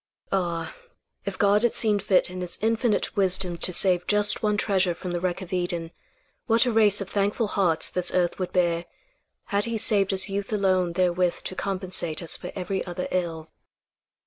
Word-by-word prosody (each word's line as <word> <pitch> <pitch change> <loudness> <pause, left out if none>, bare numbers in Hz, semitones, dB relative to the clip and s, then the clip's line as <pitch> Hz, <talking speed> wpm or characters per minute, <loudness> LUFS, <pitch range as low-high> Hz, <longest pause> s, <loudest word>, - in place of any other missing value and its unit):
Ah! 175 -3 -1 0.5
If - - -4
God 205 0 +3
had 240 -1 +2
seen 210 -3 +2
fit 190 -2 +2
in 180 0 -6
his 180 -1 -4
infinite 225 0 0
wisdom 185 -2 +1
to 180 - +1
save 180 -1 +1
just 210 0 +2
one 210 -1 +1
treasure 190 -4 +1
from 180 +1 -6
the 175 - -2
wreck 185 +1 -2
of 185 - -9
Eden, 175 -2 -1 0.6
what 230 0 +4
a 245 - +1
race 210 -2 +4
of 195 - -5
thankful 205 +2 0
hearts 175 -6 +1
this 180 -1 -2
earth 175 0 0
would 185 - -3
bear, 170 -2 +1 0.7
had 200 +1 +4
he 230 -1 -2
saved 205 -3 +2
us 190 0 +3
youth 200 +1 -4
alone 185 -4 +1
therewith 180 0 0
to - - -5
compensate 185 -4 -2
us 165 - +1
for - - -7
every 190 0 -3
other 180 0 -5
ill. 165 -3 -3
185 Hz, 185 wpm, -25 LUFS, 175-205 Hz, 0.7 s, what